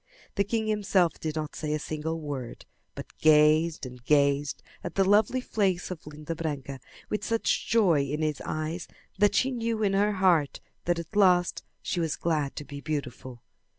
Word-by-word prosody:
The 200 - +2
king 220 +2 -1
himself 200 -5 +1
did 155 -1 -3
not 155 -1 -4
say 150 -1 -2
a - - +1
single 155 +2 -4
word, 140 -6 -6 0.3
but - - -9
gazed 155 +1 +4
and 125 -1 -10
gazed 140 +1 +2 0.2
at - - -6
the 195 - +4
lovely 215 +5 +3
face 190 -7 -1
of 165 -4 -8
Linda 150 +2 -6
Branca 140 -5 -4 0.3
with 210 - -1
such 230 0 0
joy 190 -10 +4
in 150 +3 -2
his 155 -2 -1
eyes 155 +3 -3 0.3
that 205 0 +4
she 265 - +2
knew 230 -3 -1
in 195 -1 +2
her 205 +2 +2
heart 180 -7 +2 0.3
that 175 0 +1
at 170 +5 -7
last 180 -3 +3 0.2
she 180 - -2
was 165 -2 0
glad 155 -4 -1
to 145 - -6
be 140 -1 -8
beautiful. 130 -5 -5
160 Hz, 180 wpm, -27 LUFS, 150-195 Hz, 0.3 s, gazed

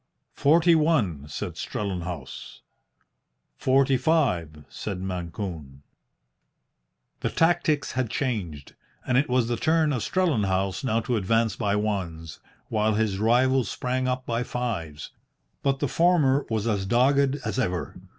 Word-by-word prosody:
"Forty 165 +4 +4
one," 135 - +1
said 75 - -5
Strellenhaus. 90 -8 -5 0.9
"Forty 135 0 +3
five," 105 - 0
said 100 -4 -5
Mancune. 85 -6 -6 1.4
The - - -1
tactics 165 -3 +1
had 130 -3 -1
changed, 95 - -3 0.3
and 125 - 0
it 140 +4 +2
was 125 -2 +2
the 120 -1 -1
turn 155 +1 +2
of 125 - -1
Strellenhaus 100 - 0
now 115 -3 +1
to 120 +1 -1
advance 110 +1 +1
by 105 -2 0
ones, 90 -7 -3 0.3
while 110 -1 +1
his 105 -3 0
rival 125 +4 +3
sprang 130 +3 -2
up 130 0 -2
by 115 0 -1
fives. 100 -13 -4 0.5
But 135 -1 +1
the 145 - -1
former 150 -4 +3
was 110 -2 -1
as 100 -4 -1
dogged 135 +4 +3
as - - -2
ever. 90 -8 -2
115 Hz, 130 wpm, -25 LUFS, 95-135 Hz, 1.4 s, Forty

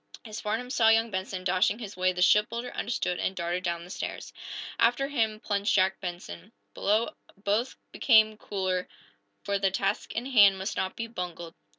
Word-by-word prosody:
As 215 -1 -6
Farnum 230 +4 -2
saw 225 -4 +4
young 225 0 +3
Benson 190 -1 -4
dashing 185 +3 +2
his 210 -5 -8
way 185 0 +2
the 180 0 0
shipbuilder 230 +5 +2
understood 200 -5 -2
and 190 - -1
darted 175 +1 -2
down 170 -1 -2
the 180 - -11
stairs. - - -6 0.5
After 245 +4 +3
him 220 -6 0
plunged 205 -1 0
Jack 190 -1 +2
Benson. 175 - -7 0.2
Below, 215 +7 +1 0.3
both 210 +5 -1 0.2
became 220 -3 +4
cooler, 185 -3 -2 0.6
for 200 0 -1
the 195 0 +2
task 195 +1 -1
in 235 - -3
hand 205 -7 +6
must 190 +3 -4
not 190 0 -2
be 230 - -3
bungled. 175 -6 -6
200 Hz, 175 wpm, -28 LUFS, 185-225 Hz, 0.6 s, hand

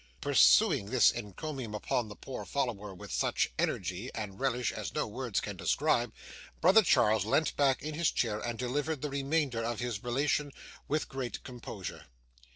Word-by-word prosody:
Pursuing 60 +12 +5
this 125 +2 +5
encomium 120 - -5
upon 110 +2 -1
the 105 - -9
poor 135 - -7
follower 115 -7 -2
with 90 - -10
such - - +1
energy 95 +7 -1
and 105 -3 -5
relish 125 -2 0
as - - -6
no - - +1
words - - -2
can - - -5
describe, - - +1 0.5
brother 190 +6 +7
Charles 110 - +4
leant 155 - +1
back 135 -2 +2
in 155 +1 -4
his 160 +1 +2
chair, 105 -3 0
and 120 0 -4
delivered 145 +4 -2
the 150 - -2
remainder 140 -3 0
of 115 -1 -2
his 120 -4 -3
relation 140 +4 0 0.4
with 155 +1 0
greater 130 -5 -4
composure. 115 -6 -8
125 Hz, 165 wpm, -31 LUFS, 110-140 Hz, 0.5 s, brother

